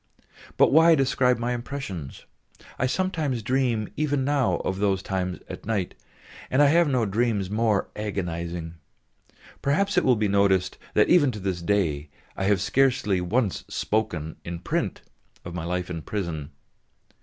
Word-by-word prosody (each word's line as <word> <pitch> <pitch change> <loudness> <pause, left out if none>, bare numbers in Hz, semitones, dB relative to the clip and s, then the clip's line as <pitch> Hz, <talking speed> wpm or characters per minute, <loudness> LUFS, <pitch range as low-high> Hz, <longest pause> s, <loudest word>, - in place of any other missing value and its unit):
But - - +5
why 165 +2 +7
describe 130 -3 +2
my 120 +1 -1
impressions; 120 - -6 0.5
I 130 - +2
sometimes 150 - -1
dream 120 -3 0
even 145 -3 0
now 135 -10 +2
of 95 +1 -2
those 100 -2 +1
times 90 -2 -2
at - - -9
night, 100 -5 -1 0.6
and 130 - +1
I 145 -1 +6
have 170 +2 +4
no 125 -5 +1
dreams 105 -2 0
more 110 -2 +1
agonising. 85 -5 -4 0.9
Perhaps 195 +9 +2
it - - -4
will 125 - +4
be 105 -1 +1
noticed 95 -2 +2 0.2
that 105 - +4
even 145 -6 +5
to 105 - -6
this 95 -3 -3
day 85 -6 0 0.3
I 95 - -2
have 100 -2 +2
scarcely 115 -6 +2
once 105 +3 0
spoken 85 -8 -2
in 85 0 -5
print - - -2 0.4
of 85 - -6
my 85 -2 -4
life 90 +1 -2
in 85 -2 -5
prison. 80 -7 -4
105 Hz, 155 wpm, -25 LUFS, 90-130 Hz, 0.9 s, why